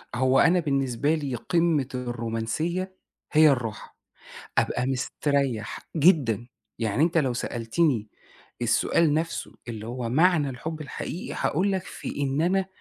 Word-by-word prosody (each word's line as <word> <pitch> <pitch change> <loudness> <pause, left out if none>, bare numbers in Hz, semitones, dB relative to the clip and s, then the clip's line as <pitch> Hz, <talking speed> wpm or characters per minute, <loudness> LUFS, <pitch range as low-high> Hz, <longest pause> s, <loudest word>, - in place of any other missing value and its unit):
هو 130 +2 +3
أنا 175 +2 +5
بالنسبة 140 -1 +1
لي 140 -5 -3
قمّة 160 0 +1
الرومانسية 125 +10 -3 0.4
هي 155 0 +7
الراحة، 115 -5 -2 0.6
أبقى 125 - +1
مستريّح 135 -2 -1 0.2
جدًا، 135 - +3 0.3
يعني 115 +3 0
أنت 165 +1 +3
لو 135 -5 +2
سألتني 120 0 0 0.5
السؤال 145 +6 +3
نَفْسه 165 +2 -2
اللي 110 -2 -6
هو 120 -1 -4
معنى 155 +1 +3
الحُب 155 +6 -6
الحقيقي، 155 +4 -5
هاقول 190 +6 +1
لك 190 - -1
في 145 - -6
إن 135 +1 0
أنا 185 +3 +2
140 Hz, 125 wpm, -26 LUFS, 120-165 Hz, 0.6 s, هي